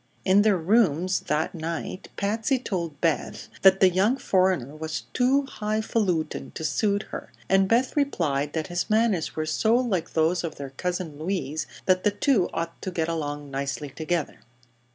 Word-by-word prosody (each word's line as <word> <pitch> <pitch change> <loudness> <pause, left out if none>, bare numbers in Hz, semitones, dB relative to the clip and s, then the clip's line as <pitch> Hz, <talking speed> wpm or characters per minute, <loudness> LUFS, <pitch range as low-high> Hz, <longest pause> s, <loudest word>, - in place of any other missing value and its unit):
In 195 +2 +5
their 205 -2 +4
rooms 185 -1 +2
that 150 +1 0
night 165 +3 -5
Patsy 220 +6 +1
told 170 - -4
Beth 165 -3 -1
that 190 0 +6
the 190 - +7
young 195 +8 +2
foreigner 185 - +1
was 155 0 -4
"too 260 +3 +3
highfalutin' 215 -7 -1
to - - -5
suit 205 +3 +1
her," - - -7 0.2
and 195 0 +4
Beth 240 +5 +2
replied 150 - 0
that 160 -1 -1
his 175 -1 -3
manners 215 -6 +1
were 155 - -1
so 220 +9 +2
like 230 -9 0
those 165 +3 +2
of 160 -2 -4
their 140 -1 -7
Cousin 175 0 -4
Louise 160 -3 -2 0.2
that 185 -1 +3
the 210 - +4
two 205 -1 +2
ought 165 0 -4
to - - -3
get 170 -3 -1
along 145 -3 -4
nicely 140 +1 -3
together. 160 +1 -2
180 Hz, 165 wpm, -26 LUFS, 155-210 Hz, 0.2 s, the